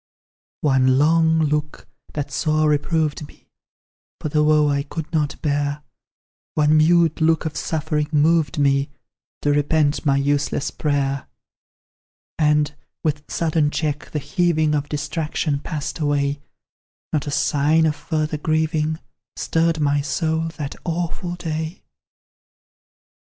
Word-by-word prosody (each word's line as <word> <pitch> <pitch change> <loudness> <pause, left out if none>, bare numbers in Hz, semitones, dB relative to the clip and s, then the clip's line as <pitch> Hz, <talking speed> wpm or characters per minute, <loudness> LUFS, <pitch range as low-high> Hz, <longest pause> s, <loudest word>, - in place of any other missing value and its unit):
One 130 -3 +3
long 160 +2 +4
look, 150 0 -2 0.3
that 145 -1 -4
sore 155 +2 +1
reproved 150 0 0
me - - -21 0.7
For 155 - -3
the 150 +1 +2
woe 150 0 +4
I 140 -1 +1
could 160 +3 -7
not 150 -2 0
bear 145 0 -1 0.7
One 150 0 +4
mute 165 +1 +4
look 160 0 +3
of 155 -1 -3
suffering 155 -1 -1
moved 155 -1 +2
me 140 -1 +2 0.5
To 145 - +3
repent 145 +1 +1
my 140 -3 +3
useless 145 0 0
prayer: 140 -2 -1 1.1
And, 150 -1 +2 0.3
with 150 -2 -2
sudden 160 -2 +1
check, 150 -1 -3
the - - -3
heaving 155 +1 +1
Of 145 -1 -1
distraction 150 0 -2
passed 150 0 -5
away; 145 -1 0 0.7
Not 150 -2 0
a - - -2
sign 150 +3 +2
of 155 -2 +1
further 155 -1 -2
grieving 155 0 0 0.4
Stirred 165 0 +1
my 145 -1 +2
soul 160 +2 -1
that 145 -2 -4
awful 175 +1 -3
day. 160 0 -4
150 Hz, 125 wpm, -22 LUFS, 145-160 Hz, 1.1 s, long